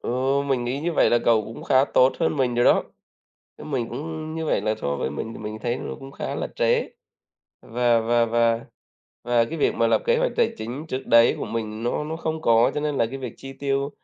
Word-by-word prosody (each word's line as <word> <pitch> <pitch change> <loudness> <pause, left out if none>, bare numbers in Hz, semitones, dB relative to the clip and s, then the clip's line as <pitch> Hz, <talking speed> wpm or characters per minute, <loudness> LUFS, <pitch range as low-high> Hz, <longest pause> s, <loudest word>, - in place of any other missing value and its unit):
Ồ, 130 +3 0
mình 135 -3 -1
nghĩ 130 +3 -2
như 170 +3 -1
vậy - - +3
là 120 - +4
cậu 110 -2 +3
cũng 115 - -9
khá 130 +1 +4
tốt 130 -1 +3
hơn 160 -2 +1
mình 130 -3 +1
rồi 120 0 +2
đó, - - +5 0.8
chứ - - -9
mình 130 -6 -2
cũng 155 +1 -5
như 160 - -3
vậy - - +1
là 110 - 0
so 70 0 -1
với 65 - -2
mình 95 +10 -5
thì - - -9
mình 105 0 -6
thấy 120 0 -1
nó - - -5
cũng 135 0 -10
khá - - -4
là - - -3
trễ - - +1 0.7
và 120 0 +2
và 120 +1 +2
và 115 0 +1 0.6
và 120 -1 +3
cái 160 +8 -6
việc - - +2
mà 115 - +2
lập 115 - +2
kế 480 - +4
hoạch - - 0
tài 475 - +2
chính 125 +8 -6
trước 130 -1 -4
đấy 115 0 +5
của - - -3
mình 110 -1 -4
nó 120 - -1
nó 160 +2 -4
không 160 -1 -3
có 115 -2 +4
cho - - -1
nên 150 0 -1
là 115 - +2
cái 135 +4 -7
việc 125 -4 -6
chi 135 - -9
tiêu, 140 +1 -2
125 Hz, 250 wpm, -24 LUFS, 115-145 Hz, 0.8 s, đó